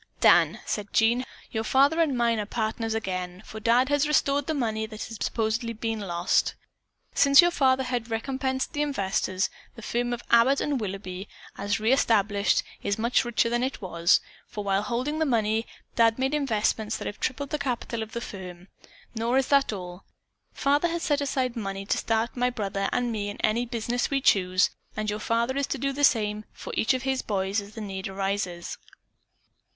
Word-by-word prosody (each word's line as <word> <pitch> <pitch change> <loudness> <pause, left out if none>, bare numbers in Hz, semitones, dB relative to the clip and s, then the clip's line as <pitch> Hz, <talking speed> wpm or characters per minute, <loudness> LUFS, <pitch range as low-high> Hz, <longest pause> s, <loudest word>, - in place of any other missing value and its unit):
"Dan," - - +5
said 210 -1 -3
Bob, 235 +3 +3 0.3
"your 220 -1 -1
father 280 +8 +4
and 285 -6 +1
mine 235 -2 +2
are - - +1
again 205 - -5
partners, 225 0 -2 0.5
for 220 - -8
Dad 240 +4 +3
has 290 +1 +2
restored 285 -1 +2
the 315 - 0
money 220 -5 -1
that 215 -1 -7
had 225 - -7
been - - -2
supposedly 225 0 -1 0.2
lost. 180 -4 0 0.6
Since 280 0 +6
your 345 0 +8
father 265 -4 +3
had 245 -2 -3
recompensed 260 +3 -2
the 295 - -1
investors, 200 -8 0 0.2
the 230 - -11
firm 240 +2 -1
of 240 0 -4
Abbott 235 +4 +5
& - - -1
Willoughby, 195 -2 -5 0.3
as 200 0 -1
re 220 +4 +3
established, 210 -5 +2 0.2
is 200 - -1
much 235 +4 +2
richer 240 -1 +1
than 240 +1 0
it 260 +2 -2
was, 170 -3 +2 0.3
for 210 - -6
while 195 0 +1
holding 250 +8 -2
the 315 - +2
money, 225 -2 +1 0.3
Dad 230 -1 +4
made 265 +2 0
investments 220 -6 0
that - - -7
have 205 - -5
tripled 275 +2 -2
the 300 - -1
capital 240 -3 -2
of 220 0 -6
the 235 - -3
firm. 185 -3 -9 0.4
Nor 235 +2 0
is 270 - +1
that 280 -3 +4
all! 180 -2 -7 0.5
Father 290 +4 +2
has 340 0 -3
set 290 -1 +1
aside 260 -3 -1
money 195 -3 -4
to - - 0
start 225 +1 0
my 250 0 +2
brother 195 -4 -2
and 245 -1 0
me 205 -2 -2
in 205 - -7
any 235 +3 +1
business 240 +1 -1
we 280 - -1
may - - -1
choose, 185 -5 +3 0.3
and 215 -1 -1
your 210 - -3
father 235 +4 0
is 280 - 0
to - - -2
do 275 +2 -1
the 290 +1 -3
same 210 -5 +2
for - - -8
each 260 - +2
of 255 - -3
his 265 -1 0
boys 195 0 -1
as 205 +1 -13
the 220 - -6
need 190 -2 -5
arises." 195 -2 -3
230 Hz, 195 wpm, -26 LUFS, 205-260 Hz, 0.6 s, your